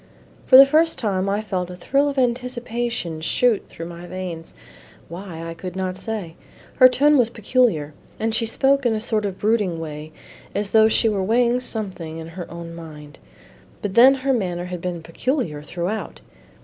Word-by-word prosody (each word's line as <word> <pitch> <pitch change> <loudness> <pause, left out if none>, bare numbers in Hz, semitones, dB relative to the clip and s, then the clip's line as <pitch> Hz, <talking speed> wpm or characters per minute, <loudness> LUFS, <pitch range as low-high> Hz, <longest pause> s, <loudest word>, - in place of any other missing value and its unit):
For 255 - +8
the 270 - +11
first 315 +4 +2
time 195 -3 -1
I 205 +2 0
felt 185 -4 -3
a 180 - -7
thrill 280 +10 +1
of 280 - -6
anticipation 240 -8 -2
shoot 230 +6 +2
through 165 - -8
my 170 +1 -9
veins. 175 -3 -7 0.5
Why, 170 -1 -8
I 165 - -5
could 180 +2 -8
not 185 -1 -2
say. 200 -5 -5 0.4
Her 255 -1 +8
tone 285 +3 +4
was 235 -2 +3
peculiar, 220 - 0 0.3
and 225 0 -1
she 230 0 +1
spoke 275 +4 +2
in 235 -3 +2
a - - -1
sort 215 -1 -1
of 190 -1 -6
brooding 210 -5 +1
way 155 -1 -7 0.4
as 205 0 -1
though 220 -1 +6
she 225 +1 +3
were 205 -3 0
weighing 235 +5 +2
something 190 -9 -3
in 160 0 -8
her 175 +1 -8
own 170 0 -8
mind; 150 -3 -11 0.6
but 205 -2 -3
then 255 +5 +7
her 270 0 0
manner 180 -6 -2
had 180 -1 -6
been 175 -2 -4
peculiar 165 - -2
throughout. 175 +7 -4
200 Hz, 180 wpm, -22 LUFS, 170-240 Hz, 0.6 s, the